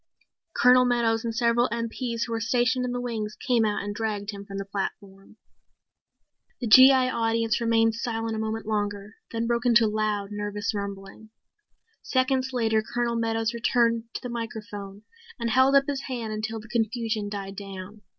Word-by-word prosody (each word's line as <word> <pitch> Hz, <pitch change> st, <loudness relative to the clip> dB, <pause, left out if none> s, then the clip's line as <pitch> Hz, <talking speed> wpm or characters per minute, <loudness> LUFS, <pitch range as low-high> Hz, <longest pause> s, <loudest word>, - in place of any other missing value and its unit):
Colonel 250 Hz, +1 st, +6 dB
Meadows 235 Hz, -2 st, +1 dB
and 230 Hz, -1 st, -3 dB
several 235 Hz, +1 st, +2 dB
MPs 230 Hz, +1 st, -3 dB
who 235 Hz, -, -8 dB
were 225 Hz, -, -1 dB
stationed 250 Hz, +2 st, +1 dB
in 250 Hz, -, -2 dB
the 245 Hz, -, -2 dB
wings 220 Hz, -4 st, -4 dB
came 245 Hz, -3 st, +1 dB
out 210 Hz, -2 st, 0 dB
and 205 Hz, 0 st, -4 dB
dragged 210 Hz, -1 st, -3 dB
him 200 Hz, -1 st, -8 dB
from 200 Hz, -1 st, -8 dB
the 195 Hz, -, -4 dB
platform. 195 Hz, +1 st, -6 dB, 1.2 s
The 245 Hz, -, -3 dB
G.I. 260 Hz, +2 st, +7 dB
audience 225 Hz, 0 st, 0 dB
remained 225 Hz, -1 st, +3 dB
silent 225 Hz, -1 st, -3 dB
a -, -, -3 dB
moment 220 Hz, 0 st, -3 dB
longer, 205 Hz, -1 st, -3 dB
then 230 Hz, 0 st, -2 dB
broke 235 Hz, +1 st, 0 dB
into 235 Hz, -2 st, +5 dB
loud, 210 Hz, -1 st, -1 dB
nervous 205 Hz, +1 st, -3 dB
rumbling. 200 Hz, +1 st, -7 dB, 0.7 s
Seconds 260 Hz, 0 st, 0 dB
later 225 Hz, -3 st, +1 dB
Colonel 235 Hz, +1 st, -2 dB
Meadows 225 Hz, 0 st, 0 dB
returned 235 Hz, -1 st, +1 dB
to -, -, -4 dB
the 250 Hz, -, -4 dB
microphone 210 Hz, -3 st, -6 dB, 0.4 s
and 235 Hz, -1 st, -1 dB
held 260 Hz, +3 st, +4 dB
up 275 Hz, 0 st, +5 dB
his 280 Hz, -2 st, -2 dB
hand 235 Hz, -4 st, -4 dB
until 220 Hz, +1 st, -3 dB
the 215 Hz, -, -12 dB
confusion 225 Hz, -2 st, -1 dB
died 195 Hz, -1 st, -6 dB
down. 195 Hz, +1 st, -9 dB
225 Hz, 170 wpm, -26 LUFS, 210-240 Hz, 1.2 s, G.I